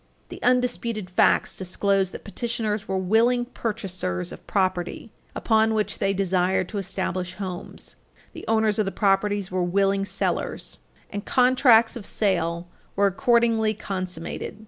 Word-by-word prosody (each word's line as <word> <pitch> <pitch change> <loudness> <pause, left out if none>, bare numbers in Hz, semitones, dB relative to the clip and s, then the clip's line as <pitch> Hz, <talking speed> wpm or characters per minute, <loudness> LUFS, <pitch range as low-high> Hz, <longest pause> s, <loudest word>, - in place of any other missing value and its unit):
The - - -9
undisputed 240 -5 0
facts 180 - +3
disclose 195 +1 0
that - - -10
petitioners 215 -1 -3
were 190 - -1
willing 230 +6 +2
purchasers 185 - -3
of - - -12
properties 185 +1 -1 0.3
upon 220 -1 +2
which 215 -1 -1
they 195 -1 +1
desired 185 -1 +1
to 210 - -3
establish 185 -1 -3
homes. 185 -3 -7 0.4
The - - -9
owners 220 -1 +2
of 210 - +1
the - - -1
properties 200 -1 +1
were 185 0 0
willing 195 +2 +1
sellers, - - -3 0.3
and 205 0 -4
contracts 250 -3 +4
of 225 -5 -5
sale 170 -4 0 0.3
were 200 - +3
accordingly 230 0 +2
consummated. 185 0 -5
200 Hz, 135 wpm, -24 LUFS, 185-225 Hz, 0.4 s, contracts